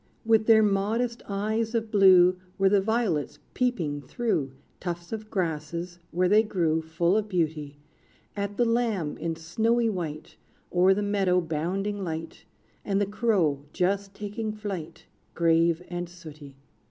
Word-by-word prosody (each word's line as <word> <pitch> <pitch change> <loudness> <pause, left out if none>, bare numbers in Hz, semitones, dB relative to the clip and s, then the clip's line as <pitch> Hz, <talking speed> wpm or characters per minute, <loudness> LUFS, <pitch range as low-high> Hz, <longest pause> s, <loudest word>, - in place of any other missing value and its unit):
With 220 -1 +3
their 220 -1 +7
modest 220 +4 0
eyes 215 +3 -1
of 225 -1 -1
blue 185 -3 +6 0.2
Were 195 0 +4
the 200 0 +4
violets 210 -8 -1 0.2
peeping 175 - -1
through 145 - -1 0.3
Tufts 175 -1 -5
of 215 -1 -5
grasses, 170 -1 -3
where 180 +2 +1
they 210 +3 +6
grew, 170 -7 0
Full 170 +3 0
of 215 -1 0
beauty, 155 -5 -2 0.6
At 200 0 -3
the 240 - +3
lamb 230 -9 0
in 165 -1 -2
snowy 225 +8 +1
white, 160 -5 -6 0.4
O'er 185 +2 +5
the 205 - -1
meadow 195 -3 +2
bounding 185 +5 -2
light, 165 -1 -6 0.4
And 195 -1 0
the 205 - +2
crow 195 - +1
just 195 +2 -1
taking 210 +1 -4
flight, 190 -7 -6 0.3
Grave 165 0 +3
and 175 0 -5
sooty. 155 -5 -12
190 Hz, 140 wpm, -27 LUFS, 165-215 Hz, 0.6 s, their